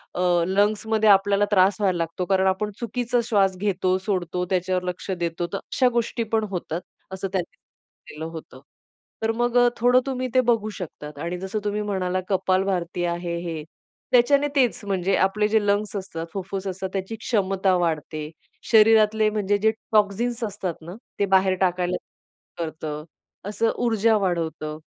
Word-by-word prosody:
अ, 180 - -1 0.3
lungs 205 +3 +1
मध्ये 220 -1 +3
आपल्याला 200 +1 +4
त्रास 190 -1 +4
व्हायला 190 -3 +2
लागतो 165 +2 -2
कारण 190 0 +2
आपण 190 +3 0
चुकीचा 245 +1 -1
श्वास 195 -4 +3
घेतो, 185 -1 +1
सोडतो 180 -3 -1
त्याच्यावर 185 0 0
लक्ष 180 +2 -7
देतो, 170 -1 -2
तर - - 0
अशा 255 +5 +1
गोष्टी 235 +1 -2
पण 220 -1 +3
होतात 175 -2 -3 0.3
असं 190 +1 -3
त्यांनी 185 -3 -2
सांगितलेलं 155 +1 -13
होतं. 155 -5 -10 0.6
तर 220 - +2
मग 240 0 +1
अ, 245 0 +6
थोडं 245 +2 +5
तुम्ही 255 -1 -2
ते 255 - +6
बघू 215 -2 0
शकतात. 150 -4 -8
आणि 170 +3 -3
जसं 190 +3 -3
तुम्ही 210 0 -1
म्हणालात 185 -3 -1
कपाल 190 -1 +2
भारती 175 -2 -2
आहे 170 0 -2
हे. 165 -3 -5 0.5
त्याच्याने 280 +4 +4
तेच 255 -4 +2
म्हणजे 195 -1 0
आपले 200 +2 +2
जे 220 +1 +3
लंग्स 205 +1 0
असतात, 185 -4 -5
फुफ्फुस 195 0 -4
असतात 190 0 -4
त्याची 195 +3 -3
क्षमता 195 -4 +1
वाढते. 155 -2 -2 0.4
शरीरातले 220 -1 +5
म्हणजे 205 -1 0
जे 220 +2 +3 0.2
टॉक्सिन्स 220 +3 +1
असतात 200 -4 -3
ना, 170 +3 -9 0.2
ते 200 - +3
बाहेर 190 0 +5
टाकायला 180 -1 +1
सुरू 165 -2 -10
करत. 150 -1 -5 0.4
असं 225 +2 +1
ऊर्जा 225 -1 +3
वाढवतं 165 -5 -2
195 Hz, 160 wpm, -24 LUFS, 180-215 Hz, 0.6 s, अ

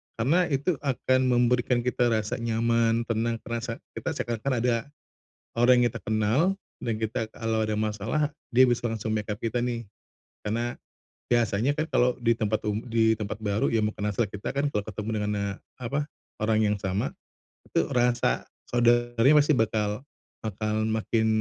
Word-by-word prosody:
Karena 160 +10 +2
itu 145 +2 0
akan 130 -2 +1
memberikan 120 0 +2
kita 125 0 +1
rasa 110 +2 -1
nyaman, 115 0 +2
tenang, 115 0 0
terasa 115 0 -3 0.2
kita - - -2
seakan-akan 120 +3 -2
ada 125 -1 +3 0.8
orang 125 +1 +5
yang - - +4
kita 115 - -7
kenal, 110 +4 +2 0.4
dan 115 - 0
kita 110 0 -2
kalau 110 -1 -1
ada 110 0 -1
masalah, 110 +8 0 0.2
dia 130 +2 +6
bisa 120 0 0
langsung 110 -1 -2
back 105 0 -2
up 105 - -6
kita 120 +1 -1
nih. 120 -2 -3 0.6
Karena, 115 +3 -2 0.6
biasanya 120 +3 +2
kan 155 - +1
kalau 125 0 +3
di 115 -1 +2
tempat 110 -1 0
um 105 +1 -1
di 110 -1 +4
tempat 105 -1 -4
baru 105 -1 0
yang 110 -2 +2
bukan 105 -1 -4
asal 110 +3 +1
kita 100 0 -6
kan 140 +1 0
kalau 105 - +1
ketemu 105 0 -5
dengan, 105 0 -1
eee, 100 0 -2 0.2
apa, 140 +4 -2 0.4
orang 110 0 +2
yang 105 0 +1
sama, 95 +1 -1 0.6
itu - - +2
rasa 120 -1 +2 0.2
saudaranya 120 +3 +4
pasti 150 +2 +3
bakal 110 +1 0 0.4
bakal 110 0 -1
makin 110 0 +1
115 Hz, 165 wpm, -27 LUFS, 110-120 Hz, 0.8 s, dia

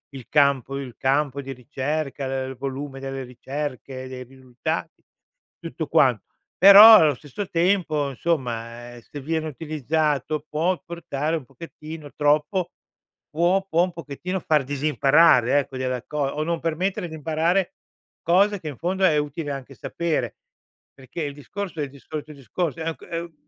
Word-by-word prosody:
il 130 - -9
campo 140 -2 +2
il 125 -4 -8
campo 140 +1 0
di 135 0 -7
ricerca, 140 +2 -3
uhm, 130 0 -3
il 130 - -7
volume 135 +1 -5
delle 135 0 -5
ricerche, 130 +1 -6
dei 130 -1 -7
risultati, 130 -1 -5 0.6
tutto - - -5
quan - - +4 0.4
però, 205 +4 +11
allo 155 -7 +6
stesso 145 +9 -7
tempo, 165 -5 +1
insomma, 120 -5 -3
ehm, 120 - -12
se 145 +4 -9
viene 160 +2 -2
utilizzato, 155 0 -1
può 170 +4 0
portare 165 -2 -3
un 145 -6 -5
pochettino 155 +2 -10
troppo 150 +5 +1 0.6
può 180 +5 +1
può 170 +2 +3
un 180 - -1
pochettino 170 +4 -5
far 155 -4 +2
disimparare, 145 -1 +4
ecco, 135 -1 -5
della 130 -1 -2
co 150 - -7
o 145 +2 -1
non 170 0 -1
permettere 175 +2 -1
di 160 - -7
imparare 165 +4 0 0.5
cose 200 +3 +3
che, 155 - -6
in 140 - -9
fondo, 190 +3 -2
è 155 -4 +4
utile 145 0 -3
anche 135 0 -7
sapere. 170 +3 -2 0.6
Perché 135 +5 -7
il 145 -1 -4
discorso 170 +4 -7
è - - 0
il 140 - -5
di 140 0 -15
solito 155 +1 -7
discorso, 145 - -3
uhm, 165 0 -2
c - - -32
uhm, 170 0 -4
150 Hz, 160 wpm, -24 LUFS, 135-165 Hz, 0.6 s, però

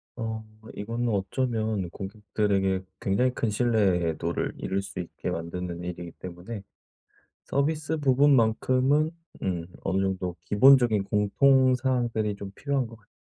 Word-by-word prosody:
어 110 -2 -4 0.3
이거는 115 +4 -2
어쩌면 110 -1 -1
고객들에게 100 -1 -1 0.2
굉장히 125 +6 +1
큰 115 - -1
신뢰도를 95 -8 +1
잃을 95 +1 -2
수 100 -1 -7
있게 85 - -5
만드는 85 +1 -4
일이기 90 -1 -6
때문에 90 +4 -7 0.8
서비스 155 +2 0
부분만큼은 135 +1 +3 0.3
음 85 -3 -2 0.2
어느 95 +1 +1
정도 95 -2 -2
기본적인 120 -2 +5
공통 130 +6 +4
사항들이 120 -5 0
좀 100 -1 -7
필요한 140 -1 -1
것 115 0 -12
같 105 - -30
105 Hz, 285 characters per minute, -27 LUFS, 95-125 Hz, 0.8 s, 기본적인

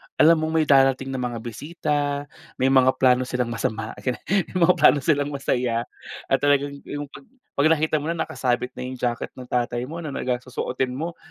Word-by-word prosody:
alam 160 +1 +6
mong 160 0 -2
may - - -3
darating 135 -1 +4
na 130 - -3
mga 120 -2 -3
bisita, 150 +6 -3 0.6
may 130 +1 +2
mga 130 -1 +5
plano 125 -1 +3
silang 125 -2 -1
masama, 115 -1 -3
ganyan. 125 -1 -3
May 195 -2 +1
mga 180 +2 +5
plano 150 -1 +6
silang 145 -2 +2
masaya 125 -3 0 0.5
at - - +4
talagang 145 0 +2 0.2
yung 145 -1 -5
'pag 265 - -13 0.3
'pag 155 +3 +5
nakita 155 0 +1
mo 150 - -4
na, 165 - 0
nakasabit 125 -6 -1
na - - -4
yung 130 - -5
jacket 120 -1 -2
ng 125 -1 -11
tatay 120 -1 -1
mo 165 - -6
na 155 -4 -5
nagas 125 -1 -2
susuotin 125 0 -2
mo. 165 +5 -5
135 Hz, 195 wpm, -23 LUFS, 125-155 Hz, 0.6 s, alam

